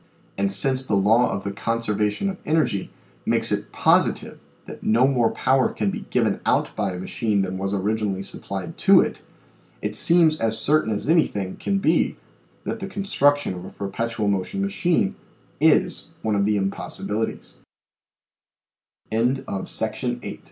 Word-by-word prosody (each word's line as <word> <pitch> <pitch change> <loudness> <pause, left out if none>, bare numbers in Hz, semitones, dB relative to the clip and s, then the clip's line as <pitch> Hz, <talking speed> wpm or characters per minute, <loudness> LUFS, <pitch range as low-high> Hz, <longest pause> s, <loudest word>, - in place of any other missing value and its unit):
And 100 0 0
since 130 +7 +2
the 110 -6 0
law 110 +5 +4
of 95 - -3
the 100 - -3
conservation 105 - -1
of 190 - -9
energy 155 -11 0 0.4
makes - - +2
it - - -2
positive - - +2 0.3
that - - -10
no 115 +4 +3
more 120 -4 +2
power 130 0 +2
can 105 -2 -1
be - - -6
given - - +1
out - - +1
by 100 -3 -1
a 90 - -6
machine 100 +2 0
than 95 0 -4
was 95 0 -2
originally 100 -1 -1
supplied 95 -1 -6
to - - +7
it, - - -3 0.6
it 105 0 -2
seems 165 +3 +4
as 110 0 +1
certain 145 0 +2
as 105 - -3
anything 105 - +1
can 195 - -1
be 195 - +1 0.5
that 225 - -4
the 195 - -5
construction 145 - +1
of 90 -1 -8
a - - -8
per 100 - -6
petual 115 +1 -2
motion 100 - -1
machine 180 - +1 0.5
is - - +2
one 110 - 0
of 100 0 +2
the 105 0 +2
impossibiliti 105 +2 -3
110 Hz, 150 wpm, -23 LUFS, 100-140 Hz, 0.6 s, to